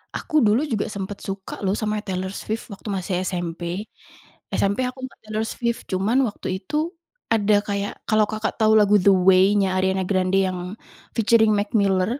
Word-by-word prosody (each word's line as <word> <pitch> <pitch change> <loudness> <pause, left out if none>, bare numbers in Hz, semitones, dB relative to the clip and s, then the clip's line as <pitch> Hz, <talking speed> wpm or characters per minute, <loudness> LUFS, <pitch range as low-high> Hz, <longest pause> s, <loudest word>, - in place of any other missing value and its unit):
Aku 305 -4 +1
dulu 225 +8 +3
juga 220 -6 -2
sempet 200 0 -6
suka 195 0 -6
loh 190 - +1
sama 210 0 -2
Taylor 190 -1 -4
Swift 220 +1 -4
waktu 200 0 -10
masih 190 -1 -3
SMP. 175 +2 -4 0.6
SMP 200 +6 +1
aku 255 +1 -7
suka - - -21
Taylor 215 0 -2
Swift, 235 0 -2
cuman 195 +6 +1
waktu 205 - -7 0.2
itu, 310 +3 -1 0.4
ada 210 -1 +3
kayak 200 -1 -3 0.2
kalau 215 -1 +4
Kakak 215 +1 -3
tahu 220 0 +4
lagu 210 -1 +5
The 185 - 0
Way-nya 190 +1 +4
Ariane 190 0 +1
Grande 185 0 +2
yang 180 +1 -5 0.4
featuring 220 -1 +4
McMiller, 205 +2 +1
205 Hz, 160 wpm, -23 LUFS, 190-220 Hz, 0.6 s, lagu